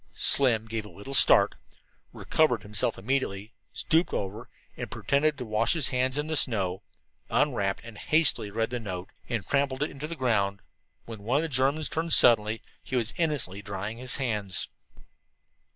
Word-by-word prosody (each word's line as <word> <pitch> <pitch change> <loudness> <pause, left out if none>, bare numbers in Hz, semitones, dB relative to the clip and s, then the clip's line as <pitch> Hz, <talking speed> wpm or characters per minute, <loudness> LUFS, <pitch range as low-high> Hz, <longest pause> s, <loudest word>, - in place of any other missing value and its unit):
Slim 120 -5 +4
gave 115 -1 -4
a 105 - -12
little 100 +9 -10
start, 135 - +5 0.6
recovered 125 -9 0
himself 105 0 -1
immediately, 105 -2 -3 0.2
stooped 165 +2 +1
over, 105 +5 -5 0.3
and, - - -6
pretending 150 +2 0
to 130 -4 -8
wash 110 +1 +1
his 155 -5 0
hands 130 +1 0
in 150 - -1
the 160 0 -3
snow, 95 -9 +1 0.5
unwrapped 120 -10 0
and 115 -3 -11
hastily 155 -9 +3
read 115 +3 -2
the 125 - -3
note, 95 -4 -7 0.2
and 115 -4 -2
then - - -23
trampled 140 -1 +1
it 150 - -3
into 140 +2 -7
the 170 - -6
ground. 100 -8 -1 0.4
When 110 -3 -9
one 120 +7 0
of 155 - 0
the 165 - -3
Germans 140 +3 +1
turned 165 +1 0
suddenly, 110 -1 +5 0.2
he 130 - -6
was 120 -2 -1
innocently 145 - 0
drying 100 +1 -6
his 125 0 -1
hands. 105 -9 -2
120 Hz, 170 wpm, -27 LUFS, 105-140 Hz, 0.6 s, start